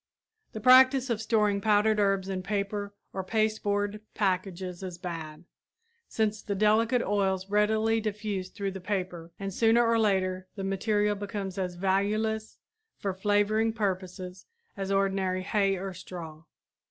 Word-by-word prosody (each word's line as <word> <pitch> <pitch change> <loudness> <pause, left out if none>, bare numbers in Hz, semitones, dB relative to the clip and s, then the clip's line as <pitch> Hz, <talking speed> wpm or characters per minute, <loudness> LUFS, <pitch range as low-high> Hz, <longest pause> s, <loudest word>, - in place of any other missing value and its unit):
The 220 - -5
practice 255 +2 +6
of 220 -2 -1
storing 210 -3 +2
powdered 210 +1 +3
herbs 195 -2 +2
in 190 -1 -3
paper 200 +1 -3 0.2
or 190 - -3
pasteboard 210 0 0
packages 185 -2 -1
is 185 -2 -6
bad, 165 -3 -6 0.6
since 215 -1 -1
the 200 - -3
delicate 225 +4 +3
oils 195 -1 0
readily 220 +2 +2
diffuse 210 -3 -3
through 200 -1 -4
the 190 0 -7
paper 180 -3 -3
and 195 -1 -4
sooner 230 +3 +4
or 230 0 +3
later 185 -3 +1
the 195 - -5
material 205 +2 +1
becomes 200 -2 -5
as 180 -2 -2
valueless 210 +4 0 0.4
for 195 -2 -2
flavoring 205 +3 +1
purposes 185 -3 -4 0.3
as 195 -1 -3
ordinary 195 -1 +1
hay 195 -1 +1
or 190 +1 -5
straw. 165 -3 -9
200 Hz, 140 wpm, -28 LUFS, 190-215 Hz, 0.6 s, practice